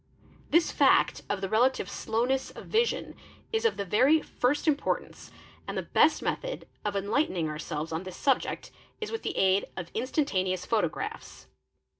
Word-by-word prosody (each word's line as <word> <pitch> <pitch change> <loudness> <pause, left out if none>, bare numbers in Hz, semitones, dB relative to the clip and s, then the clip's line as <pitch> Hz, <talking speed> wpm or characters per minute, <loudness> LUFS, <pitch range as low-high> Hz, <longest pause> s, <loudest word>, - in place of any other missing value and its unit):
This 335 +2 +3
fact - - +4
of 205 -2 -1
the 195 - -1
relative 230 +1 +2
slowness 240 +6 -1
of - - -11
vision 460 +2 0 0.4
is 445 +1 0
of 455 - +2
the 200 - -2
very 260 - +4
first 290 +2 -1
import 295 -2 +1
ance - - -15 0.4
and - - -4
the - - -1
best - - +3
method - - -3 0.2
of 205 -1 -2
enlightening 200 - 0
ourselvess 155 +1 -4
on 160 - -1
this 185 -1 -8
subject 270 -2 0 0.3
is 435 - -4
with 455 - -3
the - - -3
aid 190 +1 +3
of 175 -2 -6
instantaneous 190 - 0
photographs. 225 - -2
225 Hz, 160 wpm, -28 LUFS, 190-295 Hz, 0.4 s, fact